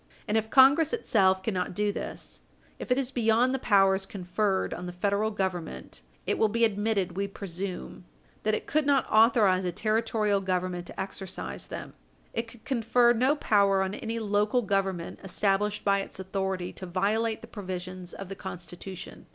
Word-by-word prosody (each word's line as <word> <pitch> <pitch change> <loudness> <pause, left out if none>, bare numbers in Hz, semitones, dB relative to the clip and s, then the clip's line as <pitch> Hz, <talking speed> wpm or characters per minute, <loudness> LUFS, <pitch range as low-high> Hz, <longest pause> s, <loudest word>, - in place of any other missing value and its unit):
And 210 - 0
if 220 0 +1
Congress 280 - +6
itself 190 - +2
cannot 185 -4 -2
do 210 +1 +1
this - - -7 0.4
if - - -6
it 250 - +4
is 270 -1 -1
beyond 240 +1 +3
the 265 - -1
powers 195 -4 +3
conferred 190 +1 -1
on 180 - -6
the - - -4
Federal 200 +4 0
Government 180 - -4 0.2
it - - 0
will 220 - +5
be 230 +2 +2
admitted, 205 -4 0
we 200 +1 -1
presume, 190 -1 -6 0.4
that 215 0 +1
it - - -5
could 300 -1 +1
not 275 -3 +3
authorize 215 -5 +5
a 180 - -1
Territorial 215 0 +1
Government 180 -2 -2
to - - -9
exercise 190 -1 -5
them. - - -7 0.4
It 230 0 -2
could 230 -1 -16
confer 240 -1 +3
no 255 +5 +3
power 200 -7 +3
on 190 +1 -3
any 225 +2 -4
local 210 +2 +1
Government 195 -4 -1
established 200 +2 0
by 200 -1 +3
its 195 - -8
authority 190 -1 -3
to 185 - -7
violate 215 +5 0
the - - -10
provisions 185 -3 -6
of 195 - -7
the 195 - -6
Constitution. 185 0 -8
200 Hz, 170 wpm, -28 LUFS, 190-225 Hz, 0.4 s, Congress